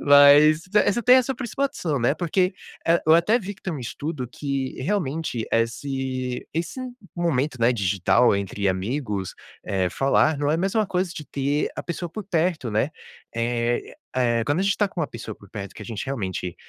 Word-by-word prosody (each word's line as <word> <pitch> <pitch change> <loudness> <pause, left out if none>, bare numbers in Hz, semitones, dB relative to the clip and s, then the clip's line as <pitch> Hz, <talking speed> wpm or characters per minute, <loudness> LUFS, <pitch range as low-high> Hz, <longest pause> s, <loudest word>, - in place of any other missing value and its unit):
mas 145 +2 +7
essa, 210 +2 +3
tem 250 +3 +7
essa 260 +1 +2
principal 260 +3 -1
opção, 170 - -2
né, 120 - +3
porque 180 +2 +1 0.5
eu 160 - +7
até 175 +8 +4
vi, 205 -2 -6
que 195 - -26
tem 185 - -3
um 155 - -4
estudo, 130 +2 -4
que 135 0 -3
realmente 155 - -1
esse 130 +2 -1
esse 170 +10 -3 0.4
momento, 150 -5 0
né, 115 +2 +4
digital 100 +2 +3
entre 100 0 -2
amigos, 100 0 -2 0.3
eh, 95 -2 0
falar 135 - +2
não 145 0 +1
é 155 - +2
mais 190 +3 -1
uma 215 -2 +2
coisa, 180 -1 -1
de 150 - -6
ter 140 +2 0
a - - -3
pessoa 170 0 -4
por 215 - -6
perto, 170 -6 0
né, 110 +7 +1 0.4
eh, 120 +1 -1 0.5
quando 145 +4 +1
a - - +2
gente 195 0 +3
está 205 - +1
com 185 - -5
uma 155 - +1
pessoa 115 -3 -7
por 100 - -18
perto, 100 -3 -7
que - - -12
a - - -8
gente 110 -3 -4
realmente 95 -9 -3
145 Hz, 185 wpm, -24 LUFS, 115-175 Hz, 0.5 s, mas